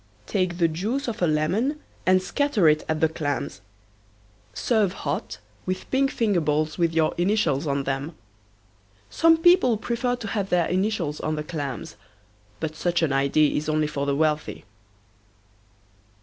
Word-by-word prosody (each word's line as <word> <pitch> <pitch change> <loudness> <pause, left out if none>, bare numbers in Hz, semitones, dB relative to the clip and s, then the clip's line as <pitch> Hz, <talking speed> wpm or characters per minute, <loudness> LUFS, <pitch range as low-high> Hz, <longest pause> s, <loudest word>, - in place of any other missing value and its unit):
Take 185 - -1
the 170 -2 +3
juice 215 - -2
of 225 -5 -4
a 175 - +3
lemon 185 - 0 0.3
and 185 0 +4
scatter 270 - +1
it 155 0 +3
at 155 -1 -1
the 160 - +5
clams. 145 -5 -3 0.9
Serve 205 - +1
hot, 145 - -4 0.3
with 185 0 -4
pink 270 +1 +2
finger 205 -9 +1
bowls 155 +1 0
with 170 -1 +2
your 160 -1 +2
initials 175 -7 +1
on 140 0 0
them. 135 +4 -3 1.0
Some 330 0 +5
people 330 -9 +5
prefer 240 +3 -1
to 235 -3 -7
have 200 -2 -2
their 175 -2 +2
initials 185 -5 -1
on 155 - -2
the 150 - -3
clams, 145 - -5 0.6
but 155 -1 -4
such 175 +1 0
an 145 -4 +1
idea 140 +2 +2
is 150 +1 -2
only 155 0 +1
for 145 -1 -3
the 140 - +1
wealthy. 155 0 -1
165 Hz, 155 wpm, -24 LUFS, 150-215 Hz, 1.0 s, the